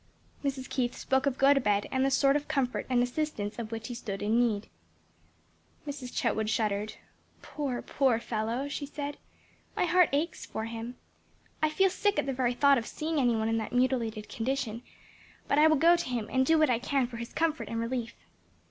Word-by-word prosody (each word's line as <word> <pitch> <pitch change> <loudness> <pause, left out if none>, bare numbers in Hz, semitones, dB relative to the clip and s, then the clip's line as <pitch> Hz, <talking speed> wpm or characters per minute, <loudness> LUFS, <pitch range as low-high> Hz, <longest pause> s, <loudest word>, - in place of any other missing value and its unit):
Mrs. 270 -2 -2
Keith 245 -2 -1
spoke 265 +1 +1
of 270 -2 0
Gotobed 270 -8 +3
and 260 -1 +1
the 270 - +3
sort 275 +1 +3
of 295 0 -1
comfort 275 -5 -1
and 245 -1 +3
assistance 245 -5 -3
of 225 -1 -5
which 225 -1 -5
he 245 - -5
stood 205 -4 -5
in 220 +3 +2
need. 220 -4 +1 1.2
Mrs. 275 -4 -6
Chetwood 220 0 0
shuddered. 215 -1 -1 0.5
"Poor, 275 -5 -3
poor 265 -4 +2
fellow!" 230 +4 -2
she 285 0 -4
said; 290 0 -5 0.6
"my - - +2
heart 360 -1 +4
aches 305 +4 -1
for 220 - -5
him. 230 +2 -6 0.7
I 310 - +3
feel 380 +5 +3
sick 405 +2 +1
at - - +1
the 270 - -1
very 250 -1 0
thought 280 0 +5
of 230 - -7
seeing 315 0 -2
any 245 -3 +3
one 220 0 0
in 225 0 +1
that 220 - -5
mutilated 240 -4 0
condition, 240 -2 -2 0.7
but 285 - +3
I 310 - +7
will 315 - +5
go 335 +4 +6
to 335 - -3
him 235 -4 -2
and 260 0 +2
do 320 - +5
what 310 -4 +4
I 230 - +2
can 270 +1 +1
for 240 -1 -8
his 235 0 -6
comfort 320 -1 -1
and 230 - -2
relief." 230 0 -3
255 Hz, 200 wpm, -29 LUFS, 230-285 Hz, 1.2 s, I